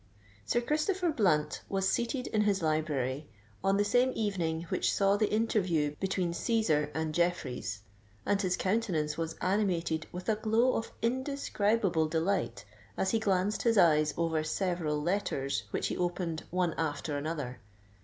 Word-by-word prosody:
Sir 240 - +2
Christopher 330 +7 0
Blunt 155 - +1
was 195 -1 0
seated 245 +5 0
in 215 - 0
his 200 -4 +1
library, 150 -3 -1 0.4
on 195 0 +3
the 205 - +2
same 245 +5 +3
evening 170 -7 -1
which - - +1
saw 200 0 +3
the 210 0 +1
interview 185 -9 +1
between 190 -3 -1
Cæsar 170 -7 +1
and 160 -1 -1
Jeffreys; 135 - -1 0.4
and 200 0 +2
his 185 -2 0
countenance 185 -8 0
was 165 0 -3
animated 180 -5 0
with 180 +1 -7
a 220 -2 +2
glow 225 +4 +2
of 225 - -3
indescribable 230 - +1
delight 160 - -1 0.3
as 190 - +1
he 225 - +2
glanced 200 0 +1
his 230 -2 +2
eyes 155 -4 +4
over 160 -2 +1
several 160 -2 -1
letters 145 - -1
which - - -1
he - - -3
opened 175 -2 -2
one 180 -2 0
after 150 -1 -2
another. 145 -4 -4
180 Hz, 150 wpm, -31 LUFS, 155-210 Hz, 0.4 s, eyes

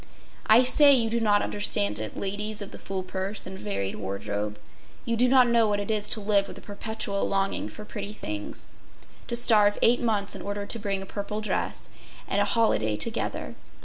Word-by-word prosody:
I 225 +4 +7
say 285 +3 +7
you 230 -3 +1
do 235 - +1
not 205 -2 +3
understand 105 - 0
it, 110 0 -5
ladies 205 +2 -2
of 200 - -9
the - - -10
full 190 -1 -4
purse 190 +3 -4
and 190 - -7
varied 100 - -3
wardrobe. 105 +2 -4 0.5
You 230 - 0
do 245 +2 +3
not 255 0 +6
know 235 -2 +3
what 205 -1 0
it 205 +2 -3
is 210 -1 -1
to 215 - +2
live 200 -1 +2
with - - -9
a - - -11
perpetual 210 -1 -3
longing 195 0 -1
for 210 - -10
pretty 205 -1 -6
things—to 105 - -8
starve 210 -4 +3
eight 240 +2 +5
months 210 -4 0
in - - -7
order 205 0 -4
to 230 - -1
bring 200 -2 -2
a - - -9
purple 205 +2 -5
dress 215 - -3 0.4
and 200 - +1
a - - +3
holiday 110 - +1
together. 105 - -2
205 Hz, 195 wpm, -26 LUFS, 195-220 Hz, 0.5 s, I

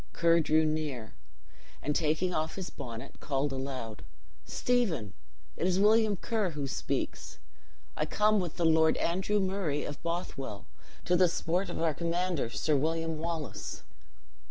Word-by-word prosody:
Ker 170 0 +4
drew 155 0 +3
near, 150 -7 -2 0.7
and 150 - 0
taking 160 +3 +1
off 155 0 -1
his 190 -2 -5
bonnet, 120 -1 -8
called 140 0 0
aloud: 130 -5 -5 0.4
"Stephen! 185 - 0 0.4
it 180 - 0
is 185 0 +2
William 215 0 +5
Ker 215 -1 0
who 150 -4 -3
speaks. - - -3 0.6
I - - -1
come 210 0 +3
with 175 -4 -3
the 170 - +1
Lord 160 0 +5
Andrew 190 +4 +1
Murray 185 -7 0
of 145 - -6
Bothwell, 165 - -4 0.4
to 180 - +3
the 180 0 +5
support 175 +3 0
of - - -4
our 165 -2 +2
commander, 170 -4 0
Sir 150 +5 +1
William 160 +2 0
Wallace." 160 - -4
165 Hz, 145 wpm, -31 LUFS, 145-180 Hz, 0.7 s, William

